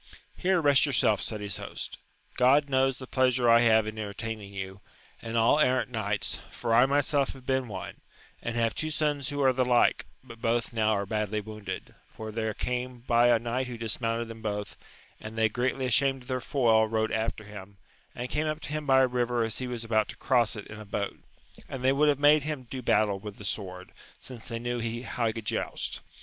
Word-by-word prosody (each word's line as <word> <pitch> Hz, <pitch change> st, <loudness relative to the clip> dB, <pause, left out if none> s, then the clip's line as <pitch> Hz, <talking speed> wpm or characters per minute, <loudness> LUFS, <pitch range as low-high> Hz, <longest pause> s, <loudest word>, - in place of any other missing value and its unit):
Here 185 Hz, 0 st, +2 dB
rest 145 Hz, -1 st, +4 dB
your 140 Hz, -, -1 dB
self, 110 Hz, -4 st, +3 dB
said 110 Hz, -2 st, 0 dB
his 100 Hz, -2 st, -3 dB
host: -, -, -6 dB, 0.4 s
God 140 Hz, +3 st, +4 dB
knows 135 Hz, -1 st, +2 dB
the 130 Hz, -, -8 dB
pleasure 130 Hz, -1 st, +2 dB
I 115 Hz, 0 st, +7 dB
have 110 Hz, -2 st, +4 dB
in 110 Hz, 0 st, -5 dB
entertaining 105 Hz, 0 st, -5 dB
you, 95 Hz, 0 st, -6 dB, 0.4 s
and 115 Hz, 0 st, -3 dB
all 115 Hz, +6 st, +4 dB
errant 130 Hz, -3 st, +2 dB
knights, 105 Hz, -3 st, -1 dB
for 115 Hz, -2 st, -2 dB
I 120 Hz, +3 st, +6 dB
myself 140 Hz, 0 st, +1 dB
have 130 Hz, -1 st, -14 dB
been 130 Hz, -1 st, 0 dB
one, 95 Hz, -4 st, -7 dB, 0.4 s
and 120 Hz, -, -3 dB
have 115 Hz, -1 st, +1 dB
two 155 Hz, -, -3 dB
sons 150 Hz, -3 st, -1 dB
who 145 Hz, -1 st, -1 dB
are 130 Hz, -1 st, +5 dB
the 130 Hz, 0 st, +2 dB
like, 125 Hz, -1 st, +3 dB, 0.2 s
but 115 Hz, -3 st, -13 dB
both 115 Hz, 0 st, 0 dB
now 110 Hz, -1 st, +2 dB
are 100 Hz, -1 st, -1 dB
badly 105 Hz, 0 st, -1 dB
wounded, 105 Hz, 0 st, -7 dB
for 110 Hz, 0 st, -8 dB
there 110 Hz, -1 st, -2 dB
came 125 Hz, 0 st, -3 dB
by 120 Hz, 0 st, +4 dB
a 120 Hz, -1 st, +5 dB
knight 120 Hz, +3 st, -2 dB
who 120 Hz, -1 st, -6 dB
dismounted 115 Hz, +1 st, -1 dB
them 115 Hz, 0 st, -9 dB
both, 105 Hz, -2 st, -3 dB, 0.4 s
and 110 Hz, +1 st, -8 dB
they 110 Hz, 0 st, +3 dB
greatly 130 Hz, +3 st, -1 dB
ashamed 135 Hz, +1 st, +2 dB
of -, -, -19 dB
their 130 Hz, -1 st, -2 dB
foil 115 Hz, -5 st, +3 dB
rode 110 Hz, 0 st, 0 dB
after 110 Hz, 0 st, -2 dB
him, 100 Hz, -1 st, -11 dB, 0.4 s
and 125 Hz, +1 st, -5 dB
came 155 Hz, +1 st, 0 dB
up 155 Hz, 0 st, -2 dB
to -, -, -7 dB
him 155 Hz, 0 st, -3 dB
by 135 Hz, -1 st, +6 dB
a 130 Hz, -, +5 dB
river 120 Hz, -1 st, 0 dB
as 115 Hz, -1 st, -2 dB
he 130 Hz, -, -3 dB
was 120 Hz, -2 st, -4 dB
about 110 Hz, -1 st, +1 dB
to -, -, -8 dB
cross 120 Hz, -4 st, +2 dB
it 105 Hz, -, -7 dB
in 105 Hz, -, -10 dB
a -, -, -7 dB
boat; 100 Hz, 0 st, -3 dB, 0.5 s
and 130 Hz, -2 st, -6 dB
they 130 Hz, +1 st, +4 dB
would 150 Hz, +2 st, +4 dB
have 145 Hz, -, +3 dB
made 145 Hz, +1 st, +6 dB
him 150 Hz, -2 st, -4 dB
do 130 Hz, +1 st, -7 dB
battle 105 Hz, -4 st, +2 dB
with 105 Hz, 0 st, -8 dB
the 105 Hz, -, -9 dB
sword, 95 Hz, -2 st, -4 dB, 0.3 s
since 120 Hz, -4 st, -9 dB
they 115 Hz, -, -4 dB
knew 120 Hz, 0 st, -3 dB, 0.2 s
how 120 Hz, -2 st, -1 dB
he 110 Hz, -, 0 dB
could 115 Hz, -1 st, -7 dB
joust. -, -, -3 dB
120 Hz, 220 wpm, -28 LUFS, 110-130 Hz, 0.5 s, I